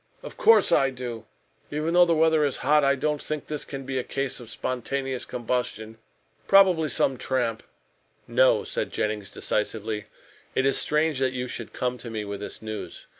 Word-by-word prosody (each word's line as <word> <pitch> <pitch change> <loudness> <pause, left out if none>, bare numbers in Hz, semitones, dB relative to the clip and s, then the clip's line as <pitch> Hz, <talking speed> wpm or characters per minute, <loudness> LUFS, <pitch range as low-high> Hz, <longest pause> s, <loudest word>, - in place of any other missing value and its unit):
"Of - - -9
course 220 -3 +5
I 135 - +4
do. 120 -4 -7 0.4
Even 155 +3 -2
though 175 0 +7
the 170 -1 +2
weather 160 -1 +4
is 140 -2 0
hot, 150 +1 +5
I 140 0 +4
don't 150 +2 -1
think 155 -2 -4
this 150 -1 -4
can 135 -1 -6
be 130 0 -2
a - - -2
case 135 0 -3
of 120 -3 -10
spontaneous 130 +2 -3
combustion. 115 -2 -3 0.5
Probably 185 -6 +5
some 135 -2 +1
tramp 120 -3 -1 0.4
" - - -40
"No," - - +5
said - - -3
Jennings 105 -2 -2
decisively, 105 0 -2 0.5
"it 130 - +2
is 135 - +2
strange 150 -2 +1
you 130 -1 0
should 115 -2 -6
come 125 0 -2
to 115 - -8
me 110 -2 -4
with 100 -1 -5
this 105 - -7
news. 110 -1 -7
130 Hz, 180 wpm, -26 LUFS, 115-150 Hz, 0.5 s, though